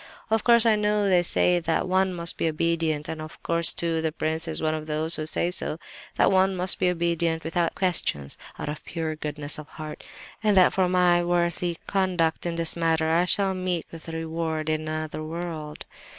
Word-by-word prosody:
"Of 220 -1 +2
course 235 -1 +6
I 225 -1 +5
know 210 -1 +1
they 180 -2 +4
say 175 0 +2
that 165 +1 -1
one 190 +1 +2
must 170 -2 -3
be - - -1
obedient, 160 -1 0
and 160 -1 -5
of 155 +1 -10
course, 170 0 +4
too, 165 -1 -1
the 160 -1 -1
prince 160 +1 -2
is 160 - -3
one 155 0 0
of 155 0 -5
those 160 +2 +1
who 155 - -3
say 170 +2 0
so: 160 - -3 0.4
that - - +3
one 190 0 +3
must 180 0 +2
be 185 - +3
obedient 170 -1 0
without 165 +1 -1
questions, 160 - 0 0.2
out - - -5
of 150 +1 -5
pure 160 -2 -4
goodness 150 -1 -2
of 150 - -9
heart, 155 -1 -9 0.4
and 210 -2 +3
that 185 - +6
for 185 -1 +2
my 180 -1 +3
worthy 175 0 0
conduct 180 -4 0
in 170 - -2
this 165 -1 +2
matter 160 -1 +1
I 170 +2 +3
shall 195 +1 +1
meet 185 -3 -2
with 165 0 -10
reward 160 -1 -3
in 155 0 -2
another 155 0 -4
world. 160 -2 -6
165 Hz, 200 wpm, -25 LUFS, 155-180 Hz, 0.4 s, course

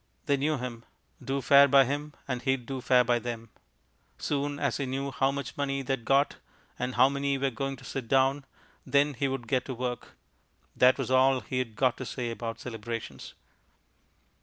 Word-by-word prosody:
They 140 - +3
knew 150 +2 0
him. 120 -2 -6 0.4
Do 135 0 -2
fair 140 0 +7
by 135 0 +6
him 145 +3 -4
and 125 -2 -2
he'd 135 -2 0
do 130 +1 -5
fair 125 0 +4
by 120 0 +2
them. 115 -1 -6 0.7
Soon 145 0 -2
as 140 -4 0
he 140 - -2
knew 135 +1 -3
how 135 +1 +1
much 140 0 -4
money 140 -1 -2
they'd 135 -3 -2
got, 140 +1 +2 0.4
and 125 +1 -2
how - - +6
many 140 0 -1
were 135 0 0
going 135 +3 -3
to 135 - -16
sit 130 -4 -5
down, 135 +2 +2 0.4
then 145 +1 +2
he 140 +2 -1
could 130 -3 -4
get 130 -1 +1
to 130 - -5
work. 125 0 -5 0.6
That 125 +1 +5
was - - -3
all 130 0 +4
he'd 130 -4 -3
got 130 +1 +2
to 130 - -5
say 120 -2 -3
about 115 0 -5
celebrations. 115 - -6
135 Hz, 185 wpm, -28 LUFS, 125-140 Hz, 0.7 s, fair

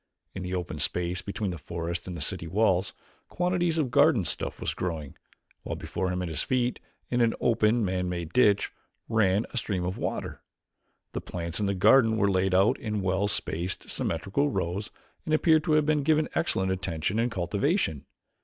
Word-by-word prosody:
In 95 - -5
the 90 0 -3
open 90 -1 -4
space 90 0 -1
between 100 -1 -3
the 85 - -6
forest 85 +3 -4
and 90 -2 -5
the - - -6
city 85 +2 -2
walls, 95 0 +2 0.4
quantities 175 -2 0
of 140 -6 0
garden 145 - +4
stuff - - -2
was - - -2
growing, 80 -6 -4 0.5
while - - -4
before 90 +1 -3
him 90 0 -2
at - - -3
his 80 - -1
feet, 125 -1 0 0.3
in 120 0 +2
an 115 -1 +3
open 115 -1 +2
man 90 -1 -1
made 85 -3 -4
ditch, 105 -5 +4 0.4
ran 110 -2 +2
a - - -4
stream 95 -6 -1
of 90 +2 -3
water! - - -4 0.7
The - - -4
plants 85 0 -4
in 105 - 0
the 100 - 0
garden 110 +3 +5
were 100 -2 +3
laid 95 0 +2
out 95 +3 +4
in 105 -2 -2
well 95 +2 +1
spaced, 90 -2 -2
symmetrical 100 - -1
rows 95 -1 -2 0.3
and 155 - +1
appeared 160 -1 +4
to 160 - +2
have 155 -1 +4
been 150 -1 +2
given 155 +1 +2
excellent 95 - +1
attention 95 +1 -1
and 120 +1 +2
cultivation. 100 - 0
100 Hz, 185 wpm, -27 LUFS, 90-120 Hz, 0.7 s, garden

